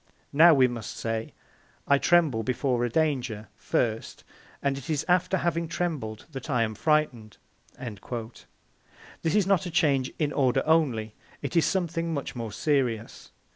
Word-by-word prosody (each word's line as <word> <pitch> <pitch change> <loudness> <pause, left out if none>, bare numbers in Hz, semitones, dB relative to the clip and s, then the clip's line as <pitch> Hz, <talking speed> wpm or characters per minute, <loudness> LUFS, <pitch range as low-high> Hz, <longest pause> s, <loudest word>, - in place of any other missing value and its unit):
Now 160 +2 +7
we 130 -2 +5
must 120 -3 -6
say, 115 -1 -3 0.6
'I 140 0 +4
tremble 160 -10 +3
before 125 +1 0
a 120 - 0
danger, 125 -7 -1
first, 115 -2 -2 0.4
and 140 -1 +1
it 135 +3 -8
is 155 -1 0
after 180 +1 +2
having 170 -1 -1
trembled 145 -12 -3
that 135 0 -7
I 125 -4 +2
am 110 -1 -2
frightened.'" 125 -6 0 0.4
This 120 +6 -7
is 210 -3 +4
not 190 -2 +2
a - - -4
change 140 -6 +2
in 150 -2 0
order 130 -3 +2
only; 130 -10 +2 0.3
it - - -4
is 165 -3 +4
something 170 -3 -1
much 140 - -4
more 115 -3 -5
serious. 125 -4 -1
140 Hz, 150 wpm, -27 LUFS, 115-160 Hz, 0.6 s, Now